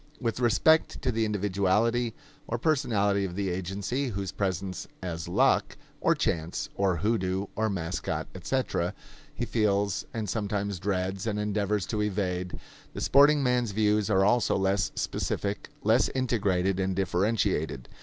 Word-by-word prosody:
With 115 Hz, -2 st, -2 dB
respect 130 Hz, +7 st, +3 dB
to 130 Hz, -, +1 dB
the 115 Hz, -1 st, +1 dB
individuality 105 Hz, +3 st, +1 dB, 0.3 s
or 120 Hz, -, -1 dB
personality 105 Hz, -8 st, +1 dB
of 90 Hz, -2 st, -4 dB
the 100 Hz, -1 st, -1 dB
agency 95 Hz, +9 st, -2 dB
whose 100 Hz, -5 st, -3 dB
presence 95 Hz, -2 st, -3 dB, 0.2 s
as 85 Hz, -3 st, -4 dB
luck, -, -, +2 dB, 0.2 s
or -, -, +3 dB
chance, 80 Hz, +1 st, -2 dB
or 95 Hz, -3 st, +1 dB
hoodoo, 95 Hz, 0 st, 0 dB
or 110 Hz, +1 st, +1 dB
mascot, 90 Hz, -3 st, -3 dB
etc., -, -, -1 dB, 0.4 s
he 120 Hz, -, -2 dB
feels 105 Hz, -3 st, 0 dB
and 110 Hz, -4 st, -3 dB
sometimes 100 Hz, -2 st, -2 dB
dreads 95 Hz, +1 st, -2 dB
and 105 Hz, -1 st, -1 dB
endeavors 105 Hz, -1 st, 0 dB
to 105 Hz, +2 st, -2 dB
evade, 90 Hz, -3 st, -2 dB, 0.4 s
the -, -, -4 dB
sporting 145 Hz, +1 st, +5 dB
man's 125 Hz, -4 st, +1 dB
views 105 Hz, 0 st, +2 dB
are 95 Hz, -2 st, +4 dB
also 120 Hz, +4 st, +3 dB
less 95 Hz, 0 st, +1 dB
specific, 100 Hz, 0 st, -2 dB
less 110 Hz, +4 st, +4 dB
integrated 95 Hz, -7 st, +1 dB
and 95 Hz, 0 st, 0 dB
differentiated. 95 Hz, -, 0 dB
100 Hz, 140 wpm, -28 LUFS, 95-115 Hz, 0.4 s, sporting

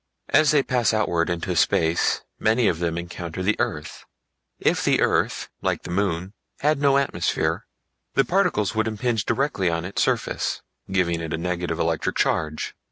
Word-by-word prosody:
As 155 Hz, -1 st, +5 dB
they 145 Hz, -2 st, +4 dB
pass 120 Hz, -3 st, +1 dB
outward 85 Hz, -6 st, +1 dB
into 85 Hz, +1 st, -2 dB
space 80 Hz, +1 st, +2 dB, 0.2 s
many 110 Hz, +1 st, +3 dB
of 80 Hz, -, +1 dB
them 85 Hz, -1 st, -1 dB
encounter 85 Hz, +1 st, -5 dB
the 105 Hz, +3 st, +2 dB
earth. 75 Hz, 0 st, -3 dB, 0.5 s
If -, -, +1 dB
the -, -, +3 dB
earth, -, -, +1 dB
like -, -, -1 dB
the -, -, -6 dB
moon, 90 Hz, 0 st, -1 dB, 0.3 s
had 150 Hz, 0 st, +2 dB
no 140 Hz, -1 st, +4 dB
atmosphere 140 Hz, -, 0 dB, 0.5 s
the 135 Hz, -, +4 dB
particles 180 Hz, -, +1 dB
would 110 Hz, 0 st, 0 dB
impinge 110 Hz, 0 st, -1 dB
directly 135 Hz, -10 st, +1 dB
on 85 Hz, 0 st, -2 dB
its 95 Hz, -, -2 dB
surface, -, -, -1 dB, 0.3 s
giving 85 Hz, -3 st, +1 dB
it 80 Hz, -2 st, -4 dB
a -, -, -4 dB
negative 85 Hz, -1 st, -2 dB
electric 80 Hz, -1 st, 0 dB
charge. 75 Hz, 0 st, 0 dB
90 Hz, 165 wpm, -24 LUFS, 85-115 Hz, 0.5 s, As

